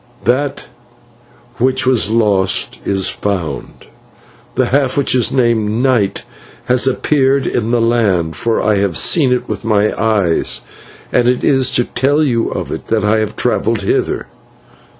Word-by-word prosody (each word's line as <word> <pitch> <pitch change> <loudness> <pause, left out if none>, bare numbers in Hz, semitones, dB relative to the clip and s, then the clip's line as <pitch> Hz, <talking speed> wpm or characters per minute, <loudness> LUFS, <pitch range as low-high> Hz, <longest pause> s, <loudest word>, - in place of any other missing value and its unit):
That 135 +4 0 0.9
which 130 +2 +1
was 125 -5 +2
lost 105 -5 +1
is 95 -1 +1
found, 95 -6 -4 0.7
the - - +2
half 135 -1 0
which 140 - +2
is 125 -2 +2
named 120 -5 +1
'Night' 120 -7 +1 0.4
has 125 +1 +2
appeared 135 0 +1
in 115 -1 -1
the 120 0 +1
land, 100 -9 +1
for 115 +6 -1
I 105 -1 +2
have 100 -3 0
seen 145 -7 +3
it 125 - -1
with - - -5
my 105 -2 +1
eyes, 100 - 0 0.5
and 120 - +3
it 125 0 +1
is 135 -2 +3
to 120 - +3
tell 140 +6 0
you 120 -5 0
of - - -5
it - - -6
that 110 -2 0
I 110 +1 +2
have 110 -1 -3
travelled - - 0
hither." - - -1
115 Hz, 150 wpm, -15 LUFS, 105-130 Hz, 0.9 s, seen